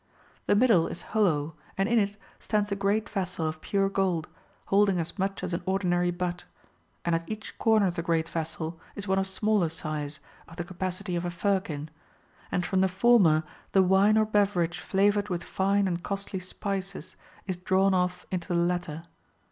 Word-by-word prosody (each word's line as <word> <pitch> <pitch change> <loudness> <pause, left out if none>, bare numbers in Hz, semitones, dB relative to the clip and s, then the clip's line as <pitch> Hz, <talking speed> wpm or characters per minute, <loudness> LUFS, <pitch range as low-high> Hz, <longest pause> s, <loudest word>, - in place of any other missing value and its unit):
The - - +4
middle 210 -7 +4
is - - -6
hollow, 165 -8 +2 0.2
and 195 +1 +2
in 235 0 +4
it] 205 0 -1 0.2
stands 210 -2 0
a - - +1
great 200 +2 +1
vessel 180 -4 -2
of 155 0 -5
pure 195 -1 +1
gold, 190 -5 0 0.4
holding 200 -1 +3
as 170 +3 -3
much 195 0 -1
as 185 -1 -3
an 170 - -1
ordinary 180 -2 +1
butt; 175 0 -3 0.6
and 170 - +1
at 165 0 -1
each 215 0 -6
corner 220 -2 +4
of 180 - +1
the 170 - -2
great 165 -1 0
vessel 165 0 -4 0.2
is 205 0 -5
one 190 0 +2
of 190 - 0
smaller 205 -2 +1
size 155 -2 -4 0.3
[of 165 - -13
the 175 - -3
capacity 185 +1 -4
of 170 - -1
a 175 - -1
firkin], 175 -5 -1 0.6
and 180 - 0
from 190 -1 +1
the 190 - +4
former 190 -5 +4 0.3
the 190 - +6
wine 195 +3 +4
or 215 - +4
beverage 195 -5 +1
flavoured 205 +3 +2
with 175 -2 -2
fine 195 +2 +1
and 175 -1 -2
costly 195 0 -4
spices 195 +1 -5 0.3
is 185 -2 -3
drawn 190 +2 +2
off" 180 -1 0
into 180 -2 -3
the 175 - -1
latter. 170 -2 -1
185 Hz, 185 wpm, -28 LUFS, 170-200 Hz, 0.6 s, the